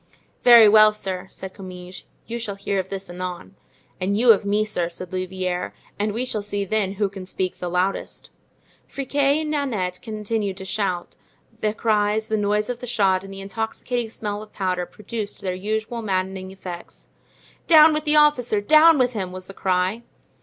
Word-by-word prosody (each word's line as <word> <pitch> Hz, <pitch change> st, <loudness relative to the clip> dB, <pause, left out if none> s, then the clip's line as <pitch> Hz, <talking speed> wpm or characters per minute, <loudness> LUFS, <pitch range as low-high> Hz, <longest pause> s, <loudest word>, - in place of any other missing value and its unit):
"Very 235 Hz, -3 st, +9 dB
well, 215 Hz, 0 st, +7 dB
sir," 190 Hz, -2 st, -4 dB
said 190 Hz, 0 st, -9 dB
Comminges, 180 Hz, -1 st, -10 dB, 0.2 s
"you 235 Hz, +1 st, -5 dB
shall 205 Hz, -3 st, -4 dB
hear 200 Hz, 0 st, -2 dB
of 190 Hz, 0 st, -4 dB
this 195 Hz, 0 st, -5 dB
anon." 180 Hz, +1 st, -6 dB, 0.4 s
"And 195 Hz, +2 st, 0 dB
you 235 Hz, +1 st, +7 dB
of 205 Hz, -2 st, +3 dB
me, 205 Hz, +1 st, +1 dB
sir," 175 Hz, -5 st, -2 dB
said 180 Hz, +1 st, -9 dB
Louvieres; 185 Hz, -1 st, -3 dB, 0.3 s
"and 210 Hz, +1 st, 0 dB
we 235 Hz, +5 st, -2 dB
shall 220 Hz, -4 st, -1 dB
see 205 Hz, -1 st, -3 dB
then 195 Hz, -1 st, 0 dB
who 200 Hz, +1 st, 0 dB
can 190 Hz, -1 st, -9 dB
speak 185 Hz, -1 st, -3 dB
the 180 Hz, -, -3 dB
loudest." 180 Hz, +2 st, -2 dB, 0.6 s
Friquet 280 Hz, +2 st, +1 dB
and 305 Hz, -1 st, -3 dB
Nanette 215 Hz, -12 st, -1 dB
continued 215 Hz, -2 st, -3 dB
to 190 Hz, -, -7 dB
shout; 190 Hz, -3 st, -2 dB, 0.4 s
the 215 Hz, 0 st, -1 dB
cries, 215 Hz, -1 st, +1 dB
the 220 Hz, -, +1 dB
noise 210 Hz, 0 st, +1 dB
of 245 Hz, -1 st, -4 dB
the 250 Hz, -, -7 dB
shot 195 Hz, -5 st, +2 dB
and 195 Hz, -, -10 dB
the 195 Hz, 0 st, -8 dB
intoxicating 225 Hz, +3 st, -3 dB
smell 210 Hz, -2 st, -4 dB
of 215 Hz, 0 st, -12 dB
powder 180 Hz, -2 st, -2 dB
produced 210 Hz, 0 st, -6 dB
their 185 Hz, -1 st, -2 dB
usual 220 Hz, +5 st, -3 dB
maddening 190 Hz, -2 st, -2 dB
effects. 185 Hz, -2 st, -10 dB, 0.6 s
"Down 315 Hz, -1 st, +8 dB
with 305 Hz, 0 st, -1 dB
the 300 Hz, 0 st, +3 dB
officer! 275 Hz, -8 st, +4 dB
down 310 Hz, +8 st, +6 dB
with 250 Hz, -2 st, +2 dB
him!" 190 Hz, -4 st, -3 dB
was 185 Hz, 0 st, -7 dB
the 195 Hz, -, -11 dB
cry. 185 Hz, +4 st, 0 dB
205 Hz, 180 wpm, -23 LUFS, 185-225 Hz, 0.6 s, Very